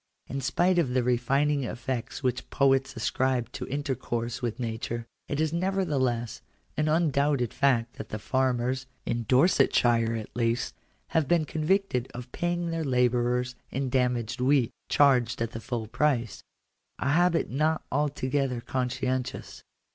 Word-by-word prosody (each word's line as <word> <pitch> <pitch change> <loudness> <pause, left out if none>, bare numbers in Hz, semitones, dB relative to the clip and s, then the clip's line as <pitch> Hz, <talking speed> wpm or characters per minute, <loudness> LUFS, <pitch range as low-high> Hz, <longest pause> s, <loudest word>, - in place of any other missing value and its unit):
In 135 +1 -4
spite 175 +7 +2
of 130 -7 0
the 130 - +3
refining 135 +4 +1
effects 120 +2 -4
which 125 -1 -1
poets 135 -1 +2
ascribe 125 +1 0
to - - -6
intercourse 130 -4 -3
with 120 -1 -3
nature, 115 0 -3 0.2
it 145 - -2
is 155 0 +1
nevertheless 150 - 0 0.3
an 155 0 +1
un 160 0 +3
doubted 140 -3 +1
fact 125 -4 +1
that - - -7
the 105 - -4
farmers 130 +2 0
— - - -41
in 115 0 -2
Dorsetshire, 120 -5 +4
at 110 -1 -7
least 115 0 0 0.2
— - - -41
have 160 -4 +1
been 165 0 +3
convicted 155 -5 0
of 125 0 -8
paying 175 -1 -1
their 165 -1 -1
labourers 125 -1 +1 0.2
in 135 0 -2
damaged 125 -2 0
wheat, 130 -2 +3 0.2
charged 125 -5 +4
at 115 0 -1
the 115 - -6
full 120 -3 -3
price 120 -2 0 0.3
— - - -51
a 140 - -1
habit 175 +1 +2
not 155 +4 +1
altogether 135 -2 0
conscientious. 130 +1 -3
130 Hz, 150 wpm, -28 LUFS, 120-145 Hz, 0.3 s, Dorsetshire